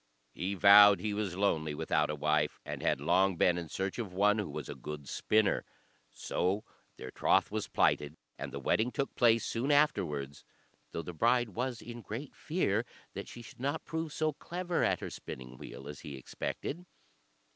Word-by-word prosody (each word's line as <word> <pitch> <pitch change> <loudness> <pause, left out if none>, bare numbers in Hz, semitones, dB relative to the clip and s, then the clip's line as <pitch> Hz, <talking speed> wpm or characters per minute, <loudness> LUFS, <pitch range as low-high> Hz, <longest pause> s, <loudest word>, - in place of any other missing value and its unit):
He 95 +3 -3
vowed 100 +1 +8
he 105 -1 -2
was 100 -4 -2
lonely 80 -6 0
without 75 +1 +1
a 75 - -1
wife, 75 0 +1
and - - -5
had - - +1
long 95 +5 +3
been 90 +1 +4
in 85 -2 -5
search 95 +7 -3
of 110 -6 -4
one 105 +3 +3
who 105 - -3
was - - -5
a - - -5
good 75 -2 -7
spinner. 105 +6 +2 0.5
So 95 - -1 0.3
their 65 - -8
troth - - +2
was - - -2
plighted, 75 +2 +1 0.2
and - - -6
the - - -5
wedding 115 +3 +1
took 140 - -2
place 115 -2 +4
soon 125 +5 -1
afterwards, 75 - +1 0.5
though 85 - -4
the 90 - -7
bride 120 +6 +2
was 120 +3 -3
in 120 0 -8
great 120 +6 -7
fear 120 - 0 0.3
that - - -6
she 120 - -10
should - - -13
not 140 +5 -2
prove 160 -1 -3
so 155 +1 0
clever 175 +3 -2
at - - +1
her - - -5
spinning 65 0 -8
wheel 65 - -9
as 75 -1 -7
he 70 -2 -8
expected. 165 - -5
100 Hz, 185 wpm, -32 LUFS, 80-120 Hz, 0.5 s, vowed